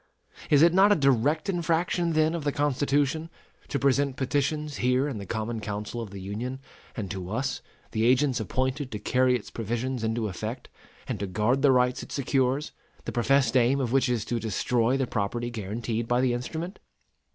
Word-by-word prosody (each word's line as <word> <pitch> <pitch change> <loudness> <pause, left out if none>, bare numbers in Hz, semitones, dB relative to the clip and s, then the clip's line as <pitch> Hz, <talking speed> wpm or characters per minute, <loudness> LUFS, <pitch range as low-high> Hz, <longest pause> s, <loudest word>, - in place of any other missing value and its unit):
Is 145 0 +6
it 170 0 +6
not 195 +3 +6
a - - +6
direct 140 - +2
infraction 170 -1 0
then 155 +1 +3
of 170 -3 -3
the 145 - +1
Constitution, 145 +2 0 0.4
to 140 - -1
present 140 0 +2
petitions 145 +2 -1
here 125 +3 +2
in 130 -7 -4
the 100 - -8
common 110 +2 -3
council 105 +2 -4
of 110 - -6
the 100 0 -8
Union, 110 +7 -4 0.4
and 100 -4 -4
to 95 -3 -5
us, 130 +4 -2 0.3
the 110 -1 0
agents 130 0 +3
appointed 130 - -2
to 105 - -3
carry 125 +4 +2
its 120 - -6
provisions 120 +2 -3
into 110 0 0
effect 110 +5 -5 0.4
and - - -3
to 100 - -2
guard 110 +8 +1
the 140 -1 +5
rights 125 0 +2
it - - -10
secures, 135 +1 0 0.3
the - - -3
professed 135 +2 +2
aim 130 +2 +4
of 125 -4 -1
which 135 -1 +3
is 120 -4 0
to 120 - -1
destroy 115 +3 +1
the 135 - +1
property 120 +2 -2
guaranteed 115 +2 -3
by 120 +1 +2
the 125 -1 +2
instrument? 160 +10 -4
125 Hz, 185 wpm, -27 LUFS, 115-140 Hz, 0.4 s, Is